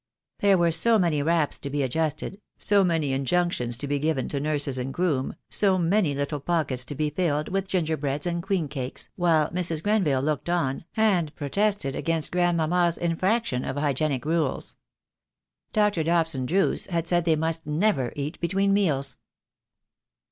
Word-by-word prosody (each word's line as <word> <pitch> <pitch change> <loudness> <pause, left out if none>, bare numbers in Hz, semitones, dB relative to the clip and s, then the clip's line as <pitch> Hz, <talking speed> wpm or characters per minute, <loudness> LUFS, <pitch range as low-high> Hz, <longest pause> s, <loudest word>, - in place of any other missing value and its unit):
There 200 -1 +4
were 170 -1 +3
so 220 +8 +4
many 170 -7 +1
wraps 160 0 +1
to 140 - -6
be 145 0 -1
adjusted, 155 - -2 0.2
so 200 -1 +3
many 165 -6 +1
injunctions 135 -4 0
to 145 - -3
be 145 0 0
given 150 -3 0
to 140 - -2
nurses 145 -3 0
and 130 +2 -3
groom, 150 -6 -1
so 195 -2 +3
many 175 -3 +2
little 145 +1 -2
pockets 140 -5 -1
to 145 - -6
be 150 +1 -1
filled 150 -2 -1
with 195 0 -1
gingerbreads 155 -6 -1
and 170 -1 -1
queen 185 -4 -1
cakes, 135 -3 -6
while 165 -4 +2
Mrs. 170 -3 0
Grenville 185 -11 +2
looked 150 +2 -1
on, 165 -4 -1
and 185 -8 +2
protested 195 -1 -1
against 165 -2 -1
grandmamma's 175 -1 +2
infraction 175 - 0
of 130 - -4
hygienic 145 -2 -1
rules. 160 -3 -1 1.0
Dr. 210 -5 +2
Dobson 165 -5 0
Drooce 195 +6 +1
had 170 -2 -1
said 175 -1 +2
they 165 -2 +3
must 160 0 -2
never 150 - +1
eat 145 +2 -4
between 195 +3 +1
meals. 140 -10 +1
160 Hz, 160 wpm, -25 LUFS, 145-180 Hz, 1.0 s, There